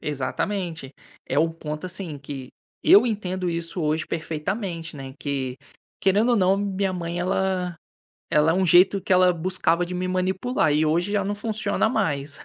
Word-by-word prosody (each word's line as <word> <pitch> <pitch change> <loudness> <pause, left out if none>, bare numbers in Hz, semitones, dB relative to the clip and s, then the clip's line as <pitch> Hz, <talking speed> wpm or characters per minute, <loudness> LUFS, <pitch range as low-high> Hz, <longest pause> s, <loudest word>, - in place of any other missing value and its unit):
exatamente. 155 +1 -3 0.3
É 135 - 0
o 165 +2 +4
ponto, 155 +1 -6
assim, 175 -4 -5
que 135 -2 -8 0.3
eu 210 +5 +7
entendo 185 -4 -2
isso 170 +1 -3
hoje 155 +1 0
perfeitamente, 165 +1 -4
né, 135 -1 -8
que, 135 -3 -3 0.4
querendo 205 +5 +3
ou 240 - +4
não, 190 -1 +3
minha 195 -1 -1
mãe, 170 -1 -4
ela 185 -1 -1 0.5
ela 150 +1 +4
é - - +1
um 190 +1 +2
jeito 180 +4 +5
que 190 - +1
ela 180 0 +5
buscava 175 0 0
de 180 - -6
me 180 0 -2
manipular, 185 +2 0
e 150 +1 +3
hoje 170 +6 +1
já 205 -1 +1
não 205 +2 -2
funciona 215 +1 0
mais. 145 - -1
180 Hz, 170 wpm, -24 LUFS, 155-190 Hz, 0.5 s, eu